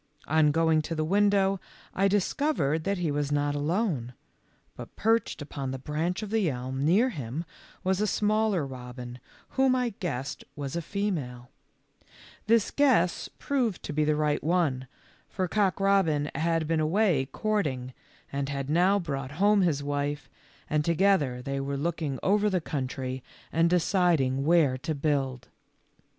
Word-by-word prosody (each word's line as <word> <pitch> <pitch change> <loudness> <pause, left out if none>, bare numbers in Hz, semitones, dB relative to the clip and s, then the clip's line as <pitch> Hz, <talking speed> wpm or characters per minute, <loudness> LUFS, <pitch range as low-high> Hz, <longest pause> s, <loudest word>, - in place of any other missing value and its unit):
On 155 0 +3
going 160 +1 +3
to 165 +2 -4
the 155 0 -1
window 195 +1 +3 0.3
I 195 +1 +2
discovered 195 - 0
that 200 0 0
he 170 -4 -1
was 145 0 -1
not 145 0 +1
alone, 145 - -1 0.6
but - - -10
perched 225 -7 +1
upon 140 -2 -5
the 130 - -3
branch 160 - -2
of 210 - -6
the 215 -6 +2
elm 130 +1 -3
near 200 - +4
him 145 - -5 0.4
was 190 +1 +1
a 210 - +2
smaller 210 -5 +1
robin, 125 -1 -8 0.3
whom 265 -1 +3
I 250 -1 +1
guessed 145 -6 -4
was 140 -1 -5
a 170 - -1
female. 155 -11 -3 1.0
This 225 -1 +3
44 290 0 +3
THE 260 - +6
LITTLE 180 -5 +4
FORESTERS. 170 - -7
guess - - -20 0.2
proved 250 -9 0
to - - -5
be 155 +1 +1
the 150 0 +2
right 150 -1 0
one, 150 -6 +1 0.4
for 185 -2 -2
Cock 195 -3 +1
robin 180 -7 +2
had 165 +1 0
been 165 0 +1
away 160 -3 +2
courting, 140 -9 -2 0.4
and 140 0 -2
had 140 0 -3
now 180 +5 +4
brought 140 -6 -4
home 205 +5 +4
his 155 -6 +1
wife, 145 +1 -2 0.4
and 150 0 +1
together 165 -7 +2
they 140 +1 -3
were 140 +1 -3
looking 155 -2 -2
over 210 +2 +3
the 185 -2 +1
country 130 -4 -4 0.3
and 165 +1 +3
deciding 170 -7 +2
where 155 -6 +3
to 155 +4 -3
build. 135 -4 -1
155 Hz, 165 wpm, -28 LUFS, 140-195 Hz, 1.0 s, THE